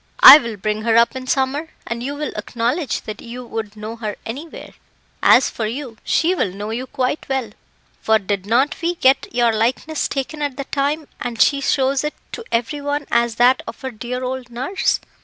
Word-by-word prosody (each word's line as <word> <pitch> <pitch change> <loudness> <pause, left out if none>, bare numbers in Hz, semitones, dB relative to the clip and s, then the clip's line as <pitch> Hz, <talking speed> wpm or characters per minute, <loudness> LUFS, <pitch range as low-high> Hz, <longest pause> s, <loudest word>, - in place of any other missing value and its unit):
"I 300 - +13
will 235 -5 -6
bring 210 +2 -2
her 225 0 +2
up 235 +3 +4
in 260 0 -6
summer, 270 +4 0 0.2
and 235 0 -4
you 280 +4 -4
will 300 +1 -4
acknowledge 245 +5 -2
that 215 -1 -8
you 245 +1 -8
would 220 -2 -6
know 215 +2 -6
her 215 -3 -4
anywhere. 285 +9 -8 0.5
As 260 - +5
for 220 - -3
you, 240 0 -6
she 335 +3 +2
will 340 - 0
know 205 +3 -6
you 250 +3 -4
quite 260 +3 -2
well, 265 -5 -1 0.5
for 220 0 +4
did 200 -1 -3
not 255 +6 +2
we 345 +1 0
get 265 -4 +3
your 235 -1 +2
likeness 255 +8 0
taken 285 +2 -4
at 285 -3 -2
the 275 - -3
time, 290 +2 -1
and 240 -2 -4
she 280 +3 +4
shows 270 0 +1
it 300 - -3 0.2
to 465 - -6
every 240 +6 -1
one 290 0 -2
as 235 -1 +2
that 245 +2 +4
of - - -7
her 265 - -3
dear 245 +3 -5
old 255 -1 -4
nurse." 260 +11 -1
250 Hz, 200 wpm, -20 LUFS, 230-280 Hz, 0.5 s, I